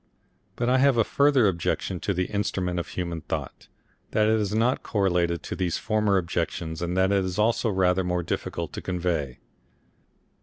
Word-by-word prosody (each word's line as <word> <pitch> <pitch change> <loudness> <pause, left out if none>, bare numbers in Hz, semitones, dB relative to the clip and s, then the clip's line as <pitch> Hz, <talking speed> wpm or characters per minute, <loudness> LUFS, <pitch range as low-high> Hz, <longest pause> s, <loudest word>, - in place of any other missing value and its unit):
But 120 - -1
I 130 +1 +4
have 135 -2 +4
a 115 - +5
further 140 -2 +3
objection 90 0 -1
to 100 - -2
the 90 +1 0
Instrument 95 -3 -2
of 85 - -4
Human 85 -2 -4
Thought, - - -5 0.4
that 110 0 +2
is 110 -2 +1
not 115 +4 +1
correlated 90 -5 0
to - - -5
these 90 -3 -1
former 105 -2 +1
objections 85 -2 -2
and 90 +1 -2
that 95 +1 +3
is 95 -2 0
also 115 +2 +2
rather 95 -1 +2
more 90 -1 -1
difficult - - -4
to - - -5
convey. 85 -7 -2
95 Hz, 165 wpm, -26 LUFS, 85-110 Hz, 0.4 s, a